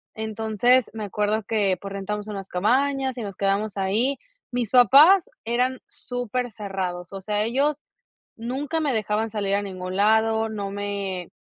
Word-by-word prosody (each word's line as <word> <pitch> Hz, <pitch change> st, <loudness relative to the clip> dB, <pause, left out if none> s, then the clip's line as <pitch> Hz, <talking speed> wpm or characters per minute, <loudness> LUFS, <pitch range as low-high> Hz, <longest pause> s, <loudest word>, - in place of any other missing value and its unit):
Entonces, 220 Hz, +3 st, +1 dB
me 220 Hz, -1 st, -4 dB
acuerdo 210 Hz, +2 st, -1 dB
que, 200 Hz, -3 st, +1 dB
pues, 195 Hz, 0 st, -7 dB
rentamos 210 Hz, +1 st, -4 dB
unas 195 Hz, -2 st, -6 dB
cabañas 265 Hz, +7 st, +1 dB
y -, -, -4 dB
nos 200 Hz, -3 st, -6 dB
quedamos 200 Hz, +1 st, 0 dB
ahí. 220 Hz, +8 st, +1 dB, 0.3 s
Mis 245 Hz, -3 st, -2 dB
papás 285 Hz, -, +7 dB, 0.2 s
eran 250 Hz, +2 st, 0 dB
supercerrados, 205 Hz, -7 st, -4 dB
o 195 Hz, -, -6 dB
sea, 210 Hz, +2 st, -1 dB
ellos 275 Hz, +6 st, 0 dB, 0.6 s
nunca 270 Hz, +7 st, -2 dB
me 290 Hz, -4 st, 0 dB
dejaban 215 Hz, 0 st, -1 dB
salir 200 Hz, -2 st, 0 dB
a 200 Hz, -, +1 dB
ningún 185 Hz, -2 st, -6 dB
lado, 220 Hz, +2 st, +3 dB
no 205 Hz, -2 st, -4 dB
me 200 Hz, -3 st, -4 dB
215 Hz, 145 wpm, -24 LUFS, 200-245 Hz, 0.6 s, papás